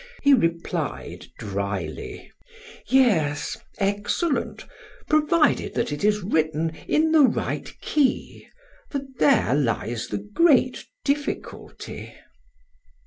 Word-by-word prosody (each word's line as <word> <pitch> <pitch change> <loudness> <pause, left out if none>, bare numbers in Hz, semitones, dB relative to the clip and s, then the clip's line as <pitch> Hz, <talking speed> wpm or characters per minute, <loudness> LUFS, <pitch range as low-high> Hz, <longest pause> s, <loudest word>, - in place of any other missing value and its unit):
He 285 -1 +6
replied 170 -8 -1
dryly: 100 -5 -5 0.6
"Yes, 190 - +2 0.2
excellent, 205 - -1 0.4
provided 310 +1 +2
that - - 0
it 145 - -4
is 210 -1 +2
written 160 -3 0 0.2
in 315 +1 +2
the 320 -1 +6
right 270 - +1
key, 285 -4 0 0.4
for 280 - -2 0.2
there 265 - +4
lies 120 -4 -1
the - - -3
great 255 +5 +2 0.2
difficulty." 285 +1 -4
205 Hz, 90 wpm, -24 LUFS, -, 0.6 s, He